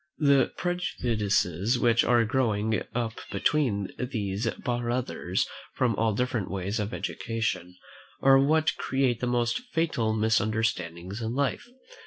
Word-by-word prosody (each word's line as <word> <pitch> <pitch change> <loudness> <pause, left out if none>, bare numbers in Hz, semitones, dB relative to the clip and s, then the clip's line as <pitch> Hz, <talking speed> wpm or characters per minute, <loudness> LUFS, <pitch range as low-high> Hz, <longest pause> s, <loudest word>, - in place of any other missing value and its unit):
The 140 -4 +4
prejudices 115 - 0
which 120 -1 +3
are 120 -1 +4
growing 110 -3 +1
up 115 -2 -2
between 100 -2 +1
these 110 -4 -2
brothers 120 +1 -1 0.3
from 120 -2 +2
the 110 +1 +1
different 120 -2 -1
ways 100 +3 -2
of 105 0 -2
education 110 -9 -3 0.4
are 135 0 +6
what 155 +3 +3
create 130 -3 0
the 125 - -1
most 120 -1 +1 0.2
fatal 140 -10 +1
misunderstandings 110 -4 0
in 115 +2 -3
life. 140 - -1
115 Hz, 120 wpm, -27 LUFS, 105-125 Hz, 0.4 s, are